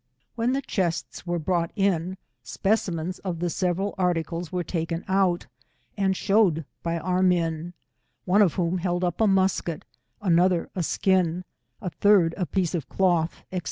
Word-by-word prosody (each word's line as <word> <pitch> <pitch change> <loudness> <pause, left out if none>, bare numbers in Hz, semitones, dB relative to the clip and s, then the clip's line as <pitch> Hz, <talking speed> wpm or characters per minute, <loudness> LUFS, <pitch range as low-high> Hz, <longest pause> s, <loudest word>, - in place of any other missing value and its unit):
— 125 - -47
When 235 +2 +1
the 275 +1 -1
chests 180 -6 -2
were 175 0 0
brought 170 0 0
in, 190 -3 0 0.2
specimens 185 -4 -1
of 180 -3 -4
the 175 +1 -1
several 185 +3 -1
articles 170 -1 -1
were 180 -1 -1
taken 165 0 -3
out, 190 -2 +2 0.5
aud 195 -2 +1
shewed 195 -7 +2 0.2
by 170 0 -1
our 180 +3 0
men, 175 -2 +1 0.5
one 190 +3 +4
of 185 -6 +3
whom 180 0 0
held 175 0 -1
up 175 +3 -1
a 220 - +5
musket, 190 -4 +1 0.3
another 180 -2 +2
a 185 - -2
skin, 180 0 +1 0.4
a 180 - -3
third 180 0 +4
a 180 -3 -2
piece 185 -4 0
of 165 -6 -3
cloth, 175 -3 +1
&c. 185 - 0
180 Hz, 160 wpm, -25 LUFS, 170-190 Hz, 0.5 s, a